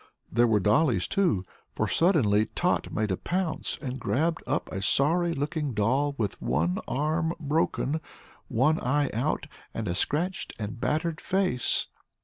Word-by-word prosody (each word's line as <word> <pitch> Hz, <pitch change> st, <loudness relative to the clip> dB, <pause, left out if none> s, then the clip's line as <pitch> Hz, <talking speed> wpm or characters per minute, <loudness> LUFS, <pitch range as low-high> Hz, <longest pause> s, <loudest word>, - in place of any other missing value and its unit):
There 120 Hz, +2 st, +4 dB
were 110 Hz, -2 st, +3 dB
dollies, 105 Hz, -, +3 dB
too, 170 Hz, -, +1 dB, 0.3 s
for -, -, 0 dB
suddenly 115 Hz, -, +3 dB
Tot -, -, +1 dB
made 105 Hz, -2 st, -1 dB
a 95 Hz, -, 0 dB
pounce 180 Hz, -2 st, -2 dB
and 130 Hz, -1 st, -4 dB
grabbed 160 Hz, +7 st, 0 dB
up 145 Hz, +3 st, 0 dB
a 95 Hz, -, -3 dB
sorry 165 Hz, -, +2 dB
looking 145 Hz, -2 st, -2 dB
doll 135 Hz, +8 st, +1 dB
with 105 Hz, -4 st, -2 dB
one 85 Hz, +4 st, +1 dB
arm 155 Hz, +5 st, 0 dB
broken, 155 Hz, 0 st, 0 dB, 0.5 s
one 150 Hz, +7 st, +2 dB
eye 145 Hz, +3 st, +1 dB
out 130 Hz, +7 st, 0 dB, 0.3 s
and 110 Hz, -2 st, -3 dB
a 85 Hz, -, 0 dB
scratched 165 Hz, -, -2 dB
and 110 Hz, +2 st, -5 dB
battered 155 Hz, +1 st, 0 dB
face. 185 Hz, -10 st, +1 dB
145 Hz, 145 wpm, -27 LUFS, 110-160 Hz, 0.5 s, There